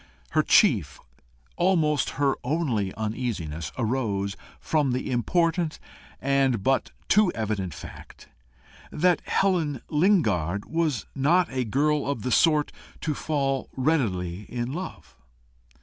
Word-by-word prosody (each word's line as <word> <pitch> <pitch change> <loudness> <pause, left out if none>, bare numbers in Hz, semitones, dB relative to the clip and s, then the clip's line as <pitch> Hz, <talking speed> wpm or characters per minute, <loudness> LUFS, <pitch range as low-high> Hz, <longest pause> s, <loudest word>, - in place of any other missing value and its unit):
Her - - +3
chief, - - +3 0.6
almost 160 -6 +2
her 140 -1 +3
only 125 - 0
uneasiness, 105 - -3
arose 105 -5 -1 0.2
from 145 -5 +1
the 130 +1 -2
important 165 +6 +1 0.4
and 135 -6 +1
but 135 0 +1 0.2
too 210 -3 +4
evident 100 -7 -3
fact, - - -12 0.6
that 180 +2 +2
Helen 170 -8 +1
Lingard 110 - +2
was 160 -6 -1
not 160 +6 +2
a 130 -1 -1
girl 145 +5 +1
of 140 -7 -3
the 125 - -2
sort 150 +4 +3 0.3
to 155 - -1
fall 135 -3 -1
readily 105 - 0
in 120 +2 -3
love. 185 +4 -7
135 Hz, 115 wpm, -26 LUFS, 110-155 Hz, 0.6 s, too